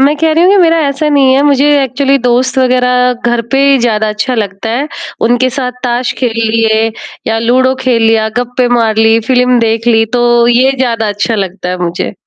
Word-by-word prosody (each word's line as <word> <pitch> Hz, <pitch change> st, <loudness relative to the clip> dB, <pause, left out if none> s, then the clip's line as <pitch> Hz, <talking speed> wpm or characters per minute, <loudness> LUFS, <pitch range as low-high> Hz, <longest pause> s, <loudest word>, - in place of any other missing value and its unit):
मैं 285 Hz, +3 st, +2 dB
कह 320 Hz, +1 st, 0 dB
रही 330 Hz, +3 st, +2 dB
हूँ 380 Hz, -, +4 dB
कि -, -, +3 dB
मेरा 330 Hz, -2 st, +3 dB
ऐसा 280 Hz, +2 st, -2 dB
नहीं 275 Hz, -3 st, +3 dB
है। 275 Hz, -, +2 dB
मुझे 285 Hz, 0 st, +2 dB
एक्चुअली 270 Hz, +2 st, 0 dB
दोस्त 250 Hz, +1 st, 0 dB
वगैरह 250 Hz, -1 st, +1 dB
घर 240 Hz, -1 st, 0 dB
पे 270 Hz, -, +2 dB
ही 270 Hz, -, +3 dB
ज़्यादा 220 Hz, -3 st, 0 dB
अच्छा 215 Hz, +4 st, -3 dB
लगता 210 Hz, 0 st, -4 dB
है। 275 Hz, +6 st, -2 dB, 0.4 s
उनके 245 Hz, +2 st, +1 dB
साथ 250 Hz, -2 st, -3 dB
ताश 245 Hz, +1 st, -1 dB
खेल 245 Hz, -3 st, -1 dB, 0.2 s
लिए 225 Hz, 0 st, +1 dB, 0.4 s
या 225 Hz, 0 st, 0 dB
लूडो 255 Hz, +3 st, +1 dB
खेल 240 Hz, -3 st, +1 dB
लिया, 225 Hz, -1 st, +2 dB
गप्पे 245 Hz, 0 st, -1 dB
मार 230 Hz, -3 st, 0 dB
ली, 225 Hz, 0 st, +3 dB
फ़िल्म 250 Hz, -1 st, +2 dB
देख 230 Hz, 0 st, -1 dB
ली 225 Hz, -1 st, +3 dB
तो 240 Hz, -1 st, +2 dB
ये 255 Hz, +3 st, +3 dB
ज़्यादा 230 Hz, -4 st, -1 dB
अच्छा 205 Hz, +3 st, -2 dB
लगता 190 Hz, -2 st, -4 dB
है 180 Hz, -, -2 dB
मुझे। 170 Hz, +3 st, -3 dB
245 Hz, 205 wpm, -10 LUFS, 225-260 Hz, 0.4 s, हूँ